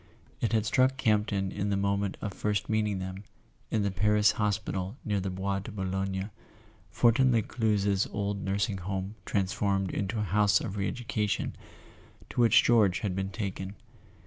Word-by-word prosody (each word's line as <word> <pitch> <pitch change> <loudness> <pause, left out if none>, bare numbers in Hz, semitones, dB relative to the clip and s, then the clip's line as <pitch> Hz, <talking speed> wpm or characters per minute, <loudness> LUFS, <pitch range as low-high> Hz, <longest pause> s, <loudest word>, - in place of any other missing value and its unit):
It 115 - 0
had 110 -2 +2
struck 130 +4 +3
Camp 110 -5 +2
ton 95 -2 -1
in 100 0 -2
the 100 - +1
moment 100 0 0
of 100 - -3
first 105 +1 -1
meeting 105 -2 0
them, 95 +1 -6 0.5
in 110 -2 +1
the 100 - 0
Paris 105 +2 +3
hospi¬ 105 -2 0
tal 95 +5 -3
near 105 -2 0
the 95 0 -2
Bois 95 +1 -2
de 100 - -8
Boulogne—Fortin 95 +5 -1
Lescluze's 105 -4 +1
old 100 -1 -3
Nursing 100 +1 -1
Home 95 +2 -3
transformed 95 -1 0
into 100 +3 -2
a 105 - 0
House 100 0 +3
of 105 -4 -5
Re 100 -1 -1
educa¬ 110 -4 -2
tion—to 110 - -6
which 115 - +6
George 105 -7 +4
had 95 -4 -2
been 95 0 -2
taken. 95 -1 -5
100 Hz, 165 wpm, -29 LUFS, 95-105 Hz, 0.5 s, which